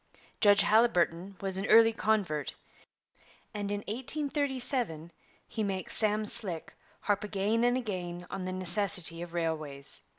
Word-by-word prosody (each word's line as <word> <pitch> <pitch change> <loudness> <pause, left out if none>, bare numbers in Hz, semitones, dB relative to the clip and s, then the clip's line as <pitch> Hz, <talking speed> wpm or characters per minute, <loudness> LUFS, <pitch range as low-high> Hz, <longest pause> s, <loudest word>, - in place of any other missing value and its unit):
Judge 205 -1 +5
Haliburton 195 -4 +1
was 190 -1 -2
an 195 +2 -3
early 225 0 +6
convert; 195 - -1 1.0
and 205 -1 -4
in 205 0 -2
1837 255 - -2 0.4
he 220 - -5
makes 195 -2 -1
'Sam 215 0 +3
Slick' 185 -6 -1 0.3
harp 205 -1 0
again 210 +3 0
and 245 +1 +2
again 180 -7 -5
on 195 -1 -5
the 185 - -3
necessity 185 -2 +1
of 175 0 -8
railways. 155 -4 -3
200 Hz, 130 wpm, -30 LUFS, 175-220 Hz, 1.0 s, early